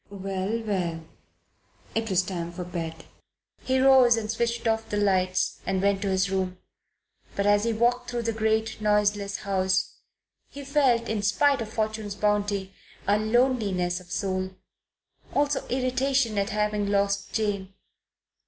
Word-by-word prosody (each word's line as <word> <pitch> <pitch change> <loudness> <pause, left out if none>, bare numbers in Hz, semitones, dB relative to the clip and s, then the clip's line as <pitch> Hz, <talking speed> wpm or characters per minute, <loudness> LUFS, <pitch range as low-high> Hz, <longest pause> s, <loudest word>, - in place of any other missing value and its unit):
Well, 195 +3 -3
well! 175 -6 -2 0.9
It 225 0 -1
was 190 -1 +3
time 175 -2 -4
for 180 +1 -6
bed. 165 -2 -6 0.6
He 260 0 +1
rose 260 -3 +6
and 215 -1 -2
switched 235 +1 -1
off 225 0 0
the 210 - -1
lights 185 -2 +1
and 190 0 -1
went 200 0 +1
to 200 - -1
his 190 0 +1
room. 185 -1 -1 0.8
But 200 - 0
as 205 +1 +4
he 230 - +1
walked 245 +2 +1
through 240 -1 -2
the 230 0 -1
great, 220 0 0
noiseless 205 -1 +1
house, 190 -1 0 0.5
he 280 0 -9
felt, 265 -5 +2
in 220 -2 -1
spite 275 +7 +2
of 220 - -4
Fortune's 215 -2 -2
bounty, 205 -2 0 0.3
a 205 +1 +3
loneliness 215 -6 +1
of 180 0 -16
soul; 185 -1 -2 0.8
also 290 0 +1
irritation 255 -3 +1
at 200 +1 0
having 210 -1 0
lost 200 0 0
Jane. 200 -3 -2
205 Hz, 145 wpm, -26 LUFS, 190-230 Hz, 0.9 s, rose